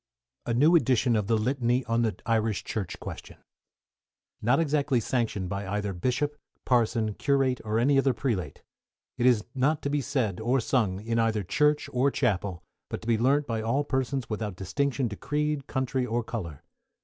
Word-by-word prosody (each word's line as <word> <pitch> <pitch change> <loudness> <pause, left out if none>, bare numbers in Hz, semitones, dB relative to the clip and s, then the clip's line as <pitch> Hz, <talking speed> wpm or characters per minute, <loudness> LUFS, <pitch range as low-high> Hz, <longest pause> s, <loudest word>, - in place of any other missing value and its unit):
A 120 - +1
NEW 155 +8 +5
EDITION 125 -4 +3
OF 105 -2 0
THE 115 0 +3
LITANY 125 +2 0
ON 115 0 +1
THE 110 -3 0
IRISH 110 -4 0
CHURCH 105 -4 -4
QUESTION - - -8 1.0
Not 125 +7 +3
exactly 145 -4 +1
sanctioned 115 -5 -1
by 100 +1 -4
either 105 0 -2
Bishop, 130 +10 -1 0.3
Parson, 115 -3 +2
Curate, 135 0 +1
or 110 0 -1
any 135 +4 +4
other 135 0 +3
Prelate. 115 -6 -3 0.6
It 120 - +4
is 115 -4 +3
not 145 +3 +1
to 140 - -1
be 145 0 +1
said 125 -8 -1
or 120 +4 +1
sung 110 -6 0
in 115 +1 -1
either 110 -2 +1
Church 150 +11 +2
or 130 +3 +3
Chapel, 100 -9 -1 0.3
but - - -5
to - - -9
be 115 -2 +2
learnt 140 +5 +3
by 115 -3 -2
all 115 +6 +1
persons 130 -2 -1
without 105 -3 -3
distinction 135 +8 -1
to 105 - -6
creed, 150 +2 -2
country, 130 0 -1
or 120 -1 -1
colour. 85 - -6
120 Hz, 175 wpm, -27 LUFS, 110-135 Hz, 1.0 s, NEW